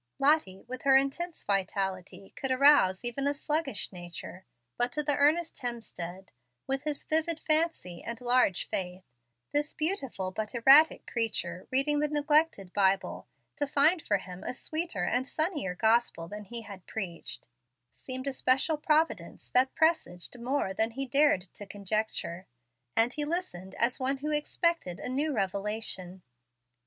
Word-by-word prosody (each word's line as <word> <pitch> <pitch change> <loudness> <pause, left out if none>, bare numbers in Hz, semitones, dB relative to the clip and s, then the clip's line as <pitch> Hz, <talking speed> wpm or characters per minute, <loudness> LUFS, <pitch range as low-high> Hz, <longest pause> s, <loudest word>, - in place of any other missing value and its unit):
Lottie, 275 -10 +2
with 255 +1 -6
her 270 -1 +6
intense 315 +6 -2
vitality, 195 -1 -2
could 270 - -3
arouse 260 -7 +5
even 270 +4 -1
a 285 - +1
sluggish 290 - -1
nature. 175 0 -9 0.3
But 245 0 0
to 300 +2 -2
earnest 300 +3 +2
Hemstead, 195 -7 -6 0.4
with 270 +2 -2
his 300 -2 -2
vivid 320 +1 +1
fancy, 310 - 0
and 235 0 -5
large 245 -6 +2
faith, 180 0 -3 0.5
this 295 +1 -1
beautiful 270 - -1
but 215 +4 -4
erratic 275 +7 +6
creature 210 -7 -2
reading 280 +3 +2
the 300 - +2
neglected 295 - +1
Bible, 195 -1 +1 0.3
to 290 - 0
find 310 +5 +4
for 205 - +1
him 180 -1 -9
a - - -4
sweeter 310 - -2
and 250 +8 0
sunnier 310 - -1
gospel 220 -5 +2
than 210 +2 -8
he 235 +3 -6
had 200 -4 -11
preached, 185 - -5 0.5
seemed 260 0 -6
a 275 - -1
special 265 +5 +2
providence 310 +2 0
that 260 +1 +3
presaged 315 - +1
more 245 -5 -1
than 220 +3 +1
he 265 +4 -4
had 260 - -9
dared 285 -8 +4
to 205 - -9
conjecture; 200 -3 -3 0.5
and 230 +2 +3
he 300 - -2
listened 290 - -4
as 235 +2 +2
one 265 +1 0
who 300 +3 -3
expected 300 - 0
a - - -5
new 290 +4 0
revelation. 195 -4 -2
250 Hz, 150 wpm, -29 LUFS, 195-295 Hz, 0.5 s, her